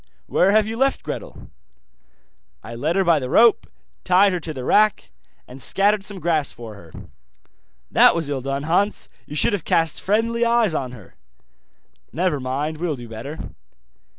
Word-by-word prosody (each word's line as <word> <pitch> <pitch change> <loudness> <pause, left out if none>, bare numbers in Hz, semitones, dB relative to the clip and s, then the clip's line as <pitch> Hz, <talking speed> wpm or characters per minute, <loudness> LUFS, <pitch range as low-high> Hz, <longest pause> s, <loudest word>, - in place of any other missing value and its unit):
'Where 185 - +2
have 215 +1 +4
you 225 +1 -5
left 270 +2 +1
Gretel?' - - -8 1.1
'I 115 - -9
led 150 +8 -2
her 195 - +3
by 170 -4 +3
the 130 -2 -5
rope, 230 - +4 0.4
tied 195 +1 +4
her 180 - -1
to 160 -1 -7
the 130 -4 -7
rack, 210 - +2 0.4
and 130 +2 -11
scattered 200 +5 +2
some 200 -1 -7
grass 160 -5 0
for 115 -2 -10
her.' 85 -6 -15 1.0
'That - - +6
was 165 -3 -2
ill 140 -2 -3
done, 135 +2 -3
Hans, 180 +7 0 0.2
you 150 - -8
should 155 - +2
have 195 -6 -2
cast 165 -2 0
friendly 230 +4 0
eyes 235 -5 +2
on 130 -5 -3
her.' 105 -7 -14 1.0
'Never 170 -2 -1
mind, 140 +4 -3
will 170 -3 -2
do 120 -2 -10
better. 115 +8 -8
165 Hz, 170 wpm, -21 LUFS, 135-205 Hz, 1.1 s, That